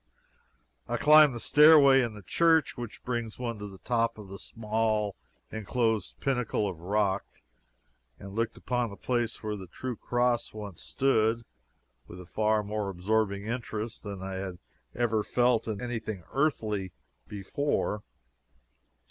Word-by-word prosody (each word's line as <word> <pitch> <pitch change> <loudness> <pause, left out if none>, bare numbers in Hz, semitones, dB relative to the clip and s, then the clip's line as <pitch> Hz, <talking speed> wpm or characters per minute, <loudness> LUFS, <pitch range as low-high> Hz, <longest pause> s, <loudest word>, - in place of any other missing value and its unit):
I - - -1
climbed 150 -3 +7
the - - -5
stairway 145 -1 +7
in 115 -3 -2
the 105 - -11
church 165 - +3
which 120 -3 -8
brings 120 -3 -3
one 115 -3 -4
to 105 - -6
the 95 -1 -11
top 115 +2 0
of 105 -3 -10
the 100 0 -8
small 110 -2 -1 0.4
inclosed 110 -1 -1
pinnacle 125 -6 0
of 90 -4 -5
rock, 100 +2 0 0.9
and 100 0 -10
looked 115 +2 -1
upon 125 -2 -1
the 100 - -9
place 120 -3 -2
where 105 -1 -2
the 95 -2 -8
true 130 +5 -5
cross 120 -1 0
once 105 -4 -8
stood, 115 -4 +1 0.6
with 90 - -10
a 90 - -10
far 110 +3 +1
more 105 -1 -3
absorbing 100 +2 0
interest 115 -1 -4
than 100 -3 -7
I 95 0 -4
had 95 -2 -5 0.4
ever 115 -3 +1
felt 120 -1 +2
in 105 -2 -3
any 120 0 -3
thing 110 -5 -6
earthly 110 - 0 0.3
before. 105 +2 -2
110 Hz, 150 wpm, -29 LUFS, 100-120 Hz, 0.9 s, climbed